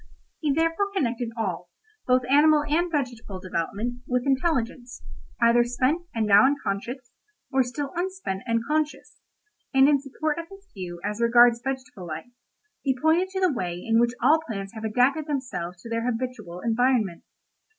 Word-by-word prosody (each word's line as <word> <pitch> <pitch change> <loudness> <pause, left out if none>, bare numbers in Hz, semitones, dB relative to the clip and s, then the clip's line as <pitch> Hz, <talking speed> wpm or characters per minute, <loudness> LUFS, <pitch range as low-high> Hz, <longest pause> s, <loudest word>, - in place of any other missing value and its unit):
He 300 -3 0
therefore 330 +6 +1
connected 240 -7 -1
all, 180 -5 -3 0.4
both 255 0 +4
animal 295 +2 +5
and 340 +4 +1
vegetable 240 - -3
development, 200 +7 -3
with 250 -1 0
intelligence, 260 -3 -1 0.4
either 235 +1 +5
spent 255 +8 0
and 225 -1 +1
now 200 +2 +7
unconscious, 245 -1 -3 0.4
or 265 -1 +3
still 270 +3 -3
unspent 360 - -3
and 230 0 0
conscious; 305 0 -2 0.6
and 270 +1 +7
in 285 -2 +3
support 300 +3 -3
of 335 - -6
his 390 0 -14
view 180 -3 -7
as 210 +3 -3
regards 235 0 +5
vegetable 255 -8 -5
life, 160 +9 -7 0.5
he 265 -2 0
pointed 325 +5 +3
to 380 0 -3
the 365 -5 +3
way 180 -7 -3
in 225 +6 +1
which 240 +1 +2
all 305 +5 +6
plants 195 -2 -5
have 220 -1 -8
adapted 255 +7 +2
themselves 245 - -4
to - - -8
their 230 +1 -1
habitual 225 -7 -5
environment. 230 -5 +1
250 Hz, 160 wpm, -25 LUFS, 225-290 Hz, 0.6 s, now